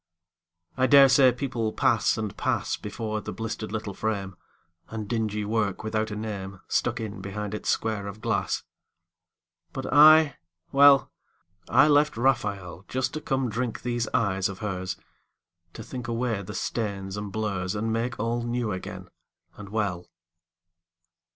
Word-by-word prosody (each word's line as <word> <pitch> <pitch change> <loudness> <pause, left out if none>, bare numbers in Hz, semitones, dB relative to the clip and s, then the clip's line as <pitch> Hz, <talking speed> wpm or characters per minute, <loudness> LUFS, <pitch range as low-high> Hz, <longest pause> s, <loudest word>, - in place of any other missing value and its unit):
I 130 0 +3
dare 140 -1 +8
say 130 -1 +6
people 120 -3 -2
pass - - +2
and 110 -2 -3
pass - - -1
Before 110 +1 -4
the - - -6
blistered 110 +1 -5
little 105 -2 -4
frame, 100 -3 -3 0.5
And 110 -2 -5
dingy 105 -2 -1
work 105 -3 -1
without 110 0 -1
a 105 - -5
name 100 -3 -5
Stuck 120 0 0
in 105 -4 -5
behind 100 +2 -5
its 105 - -3
square 110 -3 0
of 100 +1 -7
glass. - - -1 1.1
But 135 0 -4
I, 155 +1 +7 0.3
well, 140 0 +6 0.6
I 150 - +6
left 145 -3 +3
Raphael 100 -8 0
Just 130 0 -2
to 155 - -4
come 135 -3 0
drink 120 +1 -3
these 120 -2 -1
eyes 100 -6 +1
of 100 - -7
hers, 95 -3 -4 0.8
To - - -8
think 125 -2 -7
away 115 -3 -1
the 95 - -8
stains 100 -4 -3
and 105 -1 -5
blurs 100 -3 -2
And 110 +2 -1
make 120 +2 -2
all 115 +2 -1
new 120 -1 -2
again 95 - -6 0.5
and 105 -1 -10
well. 100 -5 -2
110 Hz, 150 wpm, -26 LUFS, 100-120 Hz, 1.1 s, dare